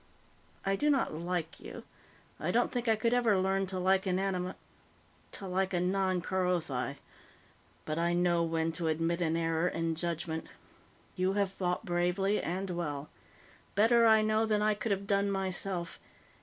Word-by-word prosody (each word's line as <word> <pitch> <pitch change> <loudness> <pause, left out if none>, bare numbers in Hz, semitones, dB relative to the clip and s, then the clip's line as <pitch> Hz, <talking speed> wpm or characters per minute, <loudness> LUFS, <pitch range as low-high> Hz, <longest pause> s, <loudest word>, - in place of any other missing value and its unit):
I 195 0 +2
do 295 +9 +1
not 275 - +2
like 170 0 -3
you; - - -9 0.6
I - - -2
don't - - +2
think 245 -1 -2
I 225 - +5
could 230 +2 +1
ever 235 -5 +3
learn 190 +1 +1
to 185 0 -2
like 190 +1 +2
an 185 -1 +1
anim... 185 -1 -1 0.8
to 195 - -3
like 190 +1 0
a - - +2
non 185 0 +1
Kerothi. 170 -9 -1 0.9
But 155 +1 -2
I 170 +1 +1
know 175 -1 +2
when 165 0 0
to 165 0 -3
admit 165 +2 0
an 165 -1 +1
error 165 +1 +1
in 165 -2 -1
judgment. 165 -1 -3 0.7
You 185 +1 +1
have 200 -1 +1
fought 180 +1 -2
bravely 180 +3 +1
and 185 +2 -3
well 150 -4 -4 0.6
better, 230 +3 +5
I 220 -1 +6
know, 215 +1 +2
than 210 -1 +2
I 215 0 +3
could 210 +2 -4
have 200 0 -1
done 200 0 +2
myself. 190 -2 -3
185 Hz, 170 wpm, -31 LUFS, 170-200 Hz, 0.9 s, I